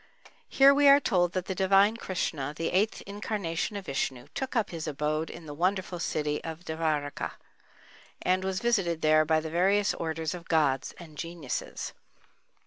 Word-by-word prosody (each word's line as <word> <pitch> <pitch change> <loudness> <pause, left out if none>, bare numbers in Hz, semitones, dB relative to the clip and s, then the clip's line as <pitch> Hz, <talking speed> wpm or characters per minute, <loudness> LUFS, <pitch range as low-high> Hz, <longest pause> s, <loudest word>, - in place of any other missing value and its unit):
Here 275 +1 +7
we 285 0 +4
are 280 +1 +8
told 175 -9 +1
that 185 -1 -2
the 190 - -2
divine 195 +3 +4
Krishna, 155 -9 -3
the 165 - -1
eighth 200 +4 +1
incarnation 200 -3 -3
of 200 -2 -5
Vishnu, 130 -4 -3
took 265 -1 -4
up 225 -4 +1
his 165 -2 -5
abode 155 +2 -1
in 170 - -10
the 145 - -7
wonderful 185 +2 -1
city 150 -3 -1
Devârakâ, 160 -3 -3 0.9
and 185 +1 +2
was 190 0 -2
visited 195 -9 +1
there 155 0 +5
by 160 0 +3
the 160 0 -6
various 195 +4 +3
orders 160 -1 -3
of 175 -2 -9
gods 140 -5 +1
and 155 -4 -12
geniuses. 165 -5 -5
170 Hz, 160 wpm, -28 LUFS, 155-195 Hz, 0.9 s, are